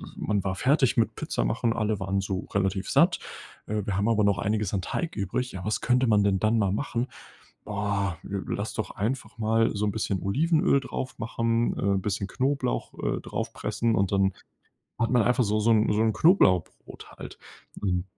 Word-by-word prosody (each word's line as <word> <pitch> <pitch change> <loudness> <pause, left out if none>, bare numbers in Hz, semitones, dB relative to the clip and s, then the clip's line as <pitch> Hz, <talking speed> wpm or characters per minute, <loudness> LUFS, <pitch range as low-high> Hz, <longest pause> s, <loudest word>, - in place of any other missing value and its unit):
man 105 -2 -1
war 95 0 -1
fertig 135 +1 +2
mit 115 - +1
Pizza - - -2
machen, 115 - 0
alle 110 -2 -1
waren 95 0 -1
so 95 0 -4
relativ 95 -1 0
satt. - - +4 0.5
Äh, 105 0 -2
wir 100 -2 -1
haben 100 +3 +1
aber 110 -2 +3
noch 100 -3 +3
einiges 105 +1 -1
an 95 - 0
Teig 165 - -3
übrig. 105 +6 -2
Ja, 95 0 -6
was 105 - -1
könnte 125 +1 +2
man 105 -2 +4
denn 95 -2 +2
dann 110 +3 +2
mal 100 -3 +2
machen? 120 +2 -2 0.6
Oh! 100 -2 -1
Lass 100 +1 -4
doch 110 - -3
einfach 115 +3 -3
mal 115 +1 +2
so 105 +1 -1
'n 105 - +1
bisschen 100 -3 -2
Olivenöl 150 - +2
draufmachen, 115 -2 -2
äh, - - -3
'n 95 - 0
bisschen 100 -1 -2
Knoblauch, 130 -1 -1
äh, - - -1
draufpressen, 115 0 -2
und 100 0 +1
dann 95 -1 +3 0.7
hat 115 - +1
man 120 -3 +4
einfach 125 +3 +2
so 105 +1 +1
so 115 +2 +2
'n 110 -1 +3
so 105 - +1
'n 110 -1 +2
Knoblauchbrot 95 - +2
halt. - - -9 0.4
Ähm, 90 -2 0
105 Hz, 190 wpm, -26 LUFS, 100-115 Hz, 0.7 s, satt